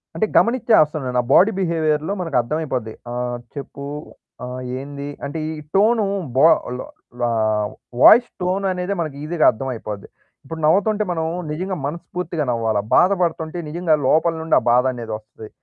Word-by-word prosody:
అంటే 220 - +1
గమనించేస్తానున్నాను. 155 - +3
ఆ - - -11
బాడీ 205 +5 +6
బిహేవియర్‌లో 160 -1 0
మనకు 165 -7 -1
అర్థమైపోద్ది. 130 -4 -3 0.2
ఆహ్, 120 0 -3 0.2
చెప్పు, 140 0 -8 0.6
ఆహ్, 125 +1 -6 0.2
ఏంది? 140 +1 -7 0.2
అంటే 145 +3 -4
ఈ - - -3 0.2
టోను 215 +2 +4 0.3
బా 150 - +7 0.3
ల్ - - -5 0.4
లా 120 - +2 0.7
వాయిస్ 240 +2 +8
టోన్ 185 +2 0
అనేదే 180 +2 -2
మనకు 155 -4 -4
ఈజీగా 160 +1 +1
అర్థమైపోద్ది. 110 -4 -6 0.4
ఇప్పుడు 160 +4 -7
నవ్వుతుంటే 205 +6 +3
మనం 160 -2 -1 0.3
నిజంగా 185 +4 -3
మనస్పూర్తిగా 170 +1 -4
నవ్వాలా. 115 -3 0
బాధ 185 +2 +5
పడుతుంటే 165 -1 -1
నిజంగా 170 0 +1
లోపల 165 +4 +3
నుండి 160 - +1
ఆ - - -11
బాధనేదొస్తది. 115 -4 -2
155 Hz, 140 wpm, -21 LUFS, 125-180 Hz, 0.7 s, వాయిస్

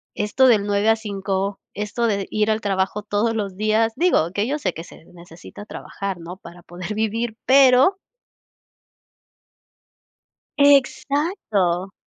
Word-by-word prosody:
esto 235 +5 +2
del 210 -4 +3
9 205 +1 +1
a 225 - +5
5, 200 -2 -3 0.2
esto 210 +3 -2
de 200 -2 -1
ir 215 0 0
al 215 - 0
trabajo 195 +1 -1
todos 210 +2 -1
los 200 -3 -3
días, 220 +1 +1
digo, 310 - +2
que 205 +4 -1
yo 290 +2 -1
sé - - -2
que 165 - -8
se 165 - -16
necesita 175 +4 -13
trabajar, 195 -3 -6
¿no?, 175 +3 -9
para 175 -1 -14
poder 180 +4 -7
vivir, 220 +1 -2
pero 270 +7 +5 2.6
Exacto. 275 - +1
210 Hz, 135 wpm, -21 LUFS, 195-230 Hz, 2.6 s, a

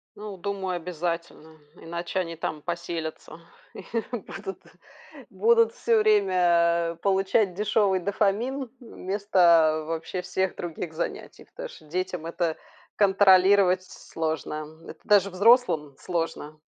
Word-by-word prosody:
Ну, 210 -1 -8
думаю, 190 -1 -3
обязательно, 170 -2 -5 0.2
иначе 170 +3 -4
они 165 -2 -3
там 155 -1 -4
поселятся 170 -2 -5 0.4
и - - -9 0.3
будут 200 -4 -7 0.7
будут 460 0 +3
всё 465 -2 +2
время 170 - +2
получать 195 0 +2
дешёвый 205 -1 +1
дофамин 220 +7 -1
вместо 180 -8 +2
вообще 165 +3 -4
всех 185 +1 -2
других 170 -1 -6
занятий, 165 - -6
потому - - -9
что 155 - -15
детям 180 +1 -4
это 165 -1 -2 0.4
контролировать 190 -1 +5
сложно. 155 -2 -5
Это - - -10
даже 200 -2 +4
взрослым 185 - +3
сложно. 165 -3 -4
180 Hz, 110 wpm, -26 LUFS, 165-200 Hz, 0.7 s, контролировать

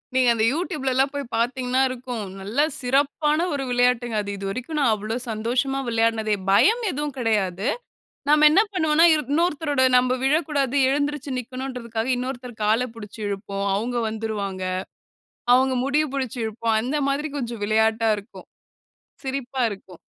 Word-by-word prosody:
நீங்க 255 -2 +4
அந்த 220 - +1
YouTubeலலாம் 270 -5 0
போய் 285 0 -3
பாத்தீங்கன்னா, 250 +2 0
இருக்கும். 245 -3 -5 0.2
நல்லா 230 +10 +1 0.2
சிறப்பான 290 +5 +1
ஒரு 275 -1 -2
விளையாட்டுங்க. 245 -2 +2
அது 200 - -5
இதுவரைக்கும் 245 +10 -4
நான் 255 -6 +3
அவ்வளோ 215 +2 -4 0.2
சந்தோஷமா 245 +5 -1
விளையாடினதே 225 -2 +1 0.2
பயம் 450 - +4
எதுவும் 290 0 -4
கிடையாது. 205 -2 0 0.6
நம்ம 300 0 +6
என்ன 390 - +6
பண்ணுவோம்னா, 320 -1 +4
இரு 305 - +2
இன்னொருத்தரோட 300 -4 +1 0.2
நம்ப 250 0 +2
விழக்கூடாது, 285 -2 +1
எழுந்திரிச்சு 290 0 -1
நிக்கணுன்றதுக்காக, 250 -2 -4
இன்னொருத்தர் 250 -2 -6
கால 225 +4 +2
புடிச்சு 215 0 -10
இழுப்போம். 200 0 -3
அவுங்க 240 +4 -2
வந்துருவாங்க. 210 -4 -4 0.9
அவுங்க 260 0 +3
முடிய 295 +2 +2
பிடிச்சு 260 -2 -3
இழுப்போம். 220 0 0
அந்த 270 +5 -1
மாதிரி 295 +2 -1
கொஞ்சம் 235 -4 -4
விளையாட்டா 220 +1 +2
இருக்கும். 205 +4 -11 0.8
சிரிப்பா 265 -1 -3
இருக்கும். 190 -3 -10
250 Hz, 135 wpm, -23 LUFS, 220-280 Hz, 0.9 s, நம்ம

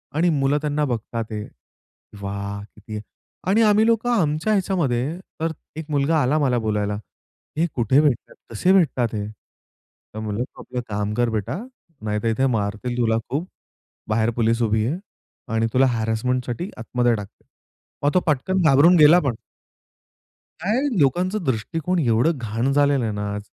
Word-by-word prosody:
आणि 170 +3 +3
मुलं 135 +2 +2
त्यांना 150 0 0
बघतात 115 -2 -3
आहे, 105 -1 -4 0.8
"वाह 100 0 -4
किती." 105 0 -9 0.5
आणि 205 +4 +4
आम्ही 215 +1 +5
लोकं 230 +1 +2
आमच्या 160 -3 +1
ह्याच्यामध्ये. 165 - 0 0.2
तर 165 0 0 0.3
एक 160 - -5
मुलगा 150 +2 +2
आला 140 +4 +2
मला 130 -4 +2
बोलायला, 105 -2 -1 0.6
"हे 165 - +3
कुठे 125 +4 +4
भेटतात? 140 -6 0
कसे 150 - +2
भेटतात 130 - +2
हे?" 105 -1 -2
तर 110 0 -17
म्हटलं, 110 +1 -2
"तू - - -12
आपलं 125 -1 -5
काम 105 0 -2
कर 120 +1 +1
बेटा, 110 - -2 0.4
नाहीतर 105 +1 -2
इथे 120 +4 +1
मारतील 105 +4 -3
तुला 115 -2 +2
खूप. 155 +7 -2 0.6
बाहेर 110 +1 +2
पोलीस 115 0 +1
उभी 110 -1 +2
आहे 150 +7 -1 0.6
आणि 115 0 +2
तुला 130 +1 +5
हॅरेसमेंटसाठी 120 - -1
आतमध्ये 120 0 +1
टाकतील." 105 -2 -10 0.6
मग 145 - +2
तो 185 - +5
पटकन 170 +6 +1
घाबरून 155 +3 +6
गेला 155 +3 +8
पण. 135 -8 -1 1.3
काय 215 +9 +1 0.2
लोकांचा 180 +9 +2
दृष्टिकोण 145 +9 -1
एवढं 130 +3 +2
घाण 115 +3 -1
झालेलं 140 -2 +3
आहे 110 - -1
ना 105 0 -3
आज 105 - -5
125 Hz, 155 wpm, -22 LUFS, 110-155 Hz, 1.3 s, गेला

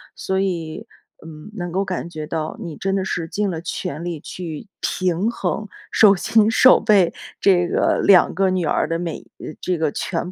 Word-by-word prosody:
所 190 0 -2
以， 180 +2 -3 0.4
嗯， 160 +5 -11
能 175 -4 -4
够 190 +3 0
感 185 -2 -4
觉 155 -2 -6
到 160 -1 -4
你 165 -4 -6
真 195 +4 -2
的 190 -1 -1
是 170 -3 -3
尽 205 +4 -1
了 165 -2 -5
全 170 -1 -5
力 170 -3 -4
去 165 +3 -7
平 185 +3 0
衡， 210 0 -3 0.2
手 205 -2 +6
心 215 +3 +3
手 255 +3 +6
背， 200 -6 +3 0.3
这 175 -3 +3
个 - - +1
2 190 -3 +6
个 190 +1 +2
女 185 -2 0
儿 - - +1
的 165 - -1
每， 170 -2 -4 0.2
呃， - - -7
这 180 -1 -1
个 155 -2 0
全 175 +4 -3
180 Hz, 200 characters per minute, -21 LUFS, 165-195 Hz, 0.4 s, 手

